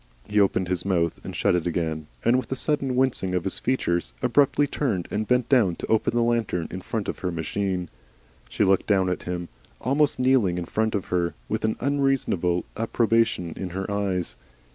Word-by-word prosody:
He 105 0 +2
opened 95 -2 +2
his 90 -1 -1
mouth 85 -4 0
and - - -7
shut - - +2
it 90 -1 0
again, 80 -2 -2 0.2
and, 120 +2 +5
with 130 -1 -2
a - - +1
sudden 135 -2 0
wincing 125 -8 +2
of 90 - 0
his 95 - -2
features, 85 - 0
abruptly 145 0 +3
turned 115 - -1
and 110 +1 -1
bent 125 0 +2
down 110 -11 +3
to - - -5
open 110 +1 +1
the 120 - +3
lantern 115 -8 0
in 95 - -5
front 110 +2 -3
of - - -4
her 90 - -2
machine. 90 +2 -2 0.6
She - - +1
looked 95 -1 +3
down 95 -3 +3
at 90 - -2
him, 90 -1 -3 0.3
almost 145 +3 +1
kneeling 125 -9 +3
in 90 - -3
front 110 +4 0
of 100 - -2
her, 85 -1 0
with - - -2
an 110 - +1
unreasonable 135 -11 +1
approbation 115 -5 +1
in 95 - -4
her 95 +1 -3
eyes. 95 -4 -1
100 Hz, 195 wpm, -25 LUFS, 90-120 Hz, 0.6 s, and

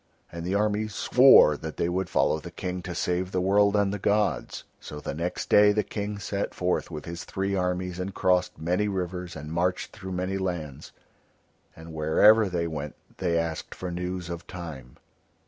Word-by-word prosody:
And 85 0 -6
the 90 +3 -1
armies 105 +1 0
swore 125 - +7
that 80 0 -7
they - - 0
would 95 +2 -2
follow 80 - +2
the 85 - -9
King 90 +1 -5
to 90 0 -6
save 90 +1 -1
the 95 - 0
world 100 +2 +3
and 100 -1 +2
the 105 - -4
gods. 105 +1 0 0.2
So 75 - -8
the - - -5
next 85 +4 -3
day 105 0 +6
the 105 +1 +1
King 105 0 -4
set 100 +1 -3
forth 90 0 -1
with 75 -3 -7
his 85 +1 -6
three 95 +1 -3
armies 90 -1 -1
and 95 +2 -3
crossed 90 -1 +1
many 90 +6 0
rivers 90 -2 -4
and 75 0 -7
marched 90 +2 -1
through 95 -3 -7
many 95 +2 -2
lands, 80 -7 -4 0.8
and 80 0 -11
wherever 100 +8 +5
they 85 -2 -1
went 75 -3 -5 0.2
they 85 -3 0
asked 85 -1 -3
for 90 -1 -5
news 90 0 -4
of 85 -1 -7
Time. 75 -9 -9
90 Hz, 185 wpm, -26 LUFS, 85-100 Hz, 0.8 s, swore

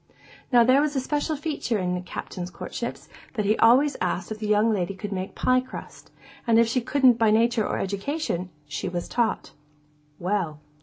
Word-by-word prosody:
Now, 240 -2 +7
there 255 +4 +5
was 300 -1 0
this 265 - 0
special 295 +3 -1
feature 285 -6 -2
in 180 -2 -1
the 180 - -2
Captain's 180 0 -6
courtships, - - -6 0.3
that 210 -3 -1
he 210 +2 +3
always 265 +6 +5
asked 180 +1 -2
if 215 - -5
the 215 - -3
young 215 +2 +3
lady 190 -1 -2
could 205 +1 -6
make 190 0 -4
pie 255 0 +3
crust; 255 - -10 0.4
and 230 -1 +5
if 230 0 +5
she 245 +2 0
couldn't 255 -1 +4
by 225 -1 +4
nature 225 0 +3
or - - -2
education, 200 - -2 0.2
she 150 +5 -4
was 175 -1 -4
taught. 235 -2 -1 0.7
Well. 175 -5 -2
220 Hz, 190 wpm, -25 LUFS, 190-255 Hz, 0.7 s, Now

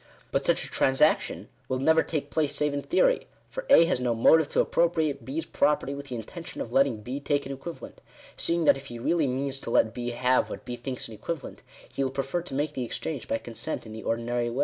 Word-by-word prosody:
But - - 0
such - - +2
a - - -8
transaction 135 +4 +2 0.2
will 130 - 0
never 160 +5 +4
take 145 -3 -3
place 155 -3 0
save 150 -1 +1
in 140 - -1
theory; - - +2 0.2
for - - -6
A 165 - +8
has 165 -6 +1
no 125 -2 0
motive 150 +6 +5
to - - 0
appropriate 160 -4 +1
B's 310 +4 -3
property 145 -2 +1
with 140 0 -7
the 125 - -5
intention 160 - -8
of 120 - -5
letting 135 -5 +3
B 130 +5 -4
take 145 0 0
an 135 - -5
equivalent: 135 +5 -8 0.3
seeing 170 -1 +1
that - - +6
if 135 - -11
he 120 - -7
really 155 +5 +1
means 135 +1 -2
to - - -7
let 110 -1 +3
B 120 0 -3
have 125 +1 +2
what - - -7
B 125 - -4
thinks 125 +1 -5
an 115 - -10
equivalent, 155 +7 -6 0.3
he 140 - -2
will 135 - 0
prefer 135 +5 -2
to 165 -6 -7
make 145 +2 -1
the 130 -3 -2
exchange 135 +3 -4
by - - 0
consent 120 +7 -5
in 110 - -9
the 110 - -7
ordinary 120 +1 -1
way. 120 +3 -4
135 Hz, 235 wpm, -27 LUFS, 120-160 Hz, 0.3 s, A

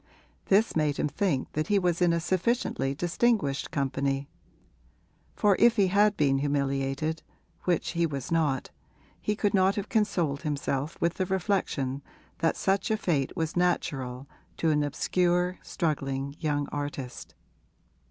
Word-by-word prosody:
This 205 +4 +3
made 150 -3 +1
him - - +1
think 155 -5 -1
that 155 +1 -2
he 205 - +3
was 180 -2 +1
in 175 -1 +5
a 170 - +1
sufficiently 175 - 0
distinguished 175 - +1
company, 140 0 -1 1.1
for 205 -2 +4
if 235 0 +6
he 200 -4 +3
had 205 +2 +3
been 135 -2 +3
humiliated 140 +2 -1 0.4
(which 175 -3 +1
he 170 -1 +1
was 140 -2 -5
not), 150 -5 +1 0.5
he 210 - 0
could 205 -1 0
not 190 0 +4
have 205 0 -4
consoled 180 -10 +1
himself 145 -1 -2
with 170 0 +1
the 185 - -2
reflection 175 -8 -1 0.4
that 165 - +1
such 195 +1 +1
a 220 - +2
fate 155 -7 -1
was 160 -1 -2
natural 135 -7 -1 0.3
to 160 - +2
an 150 -1 +2
obscure, 180 +5 +1
struggling 140 -4 -2
young 145 -3 0
artist. 145 -3 -5
160 Hz, 140 wpm, -28 LUFS, 140-185 Hz, 1.1 s, if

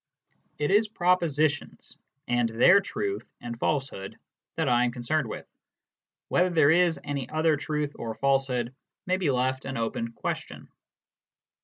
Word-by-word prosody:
It 150 +3 0
is 210 +2 +4
propositions, 170 -7 0 0.3
and 120 -1 +1
their 125 - +6
truth 395 - -4
and 120 -1 -7
falsehood, 135 -10 -2 0.4
that 160 -3 0
I 120 -1 +4
am 120 - +1
concerned 125 +4 -1
with; - - -6 0.8
whether 180 +1 +2
there 160 -4 +4
is 170 0 +3
any 140 -4 -4
other 155 0 +2
truth 150 0 -2
or 115 -1 -5
falsehood 135 -3 0 0.3
may 185 0 +1
be 180 -6 0
left 130 0 0
an 135 0 -4
open 115 0 -2
question. - - -5
145 Hz, 140 wpm, -27 LUFS, 120-165 Hz, 0.8 s, their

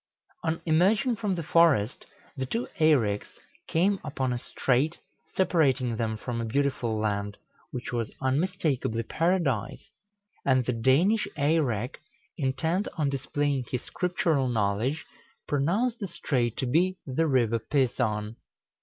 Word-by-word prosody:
On 165 0 -1
emerging 200 +9 +3
from 205 -4 -1
the 170 - -3
forest, 150 -9 +3 0.3
the 130 -2 -3
two 230 - -2
Eireks 125 -11 +2 0.3
came 195 +4 +2
upon 135 -4 -2
a 120 - -2
strait, 135 +7 0 0.4
separating 135 -10 +2
them 110 -1 -2
from 115 +1 -4
a - - -2
beautiful 120 -2 0
land, 105 -1 -2 0.3
which 125 0 -6
was 115 -2 -2
unmistakably 135 -5 0
Paradise; 165 - -1 0.5
and 130 -2 +3
the 125 - 0
Danish 150 - +3
Eirek, 140 -6 +1 0.4
intent 160 +7 0
on 145 -3 +1
displaying 140 0 -1
his 125 - -3
scriptural 165 -6 0
knowledge, 115 +6 0 0.4
pronounced 195 - +1
the 200 - -3
strait 125 -9 -1
to 135 - -1
be 175 +9 +2
the 155 +4 0
River 120 -5 +2
Pison. 115 -4 0
135 Hz, 125 wpm, -27 LUFS, 120-165 Hz, 0.5 s, emerging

